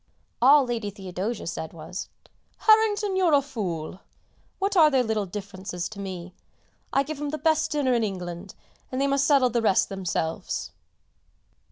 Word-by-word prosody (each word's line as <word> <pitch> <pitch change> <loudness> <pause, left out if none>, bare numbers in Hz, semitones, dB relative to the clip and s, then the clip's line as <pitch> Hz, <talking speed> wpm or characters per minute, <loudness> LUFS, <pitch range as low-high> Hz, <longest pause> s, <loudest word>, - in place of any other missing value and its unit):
All 275 +2 +7
Lady 230 -4 -2
Theodosia 195 +2 -5
said 160 -1 -5
was 165 +3 -7 0.5
"Harrington, 430 -2 +3
you're 365 -4 +3
a 280 - +4
fool. 185 - -4 0.6
What 395 +1 -1
are 320 -4 +7
their 265 -3 +3
little 220 -3 -1
differences 190 -2 -5
to 210 - -10
me? 185 -2 -6 0.6
I 275 - +3
give 295 0 -6
'em 295 - -2
the 310 - -3
best 315 0 +2
dinner 280 -4 +1
in 235 -2 +2
England, 180 -2 -5 0.4
and 255 - -2
they 275 - +2
must 275 0 +2
settle 270 -4 +4
the 235 0 +1
rest 205 -4 +3
themselves!" 180 -4 -3
230 Hz, 160 wpm, -26 LUFS, 190-290 Hz, 0.6 s, All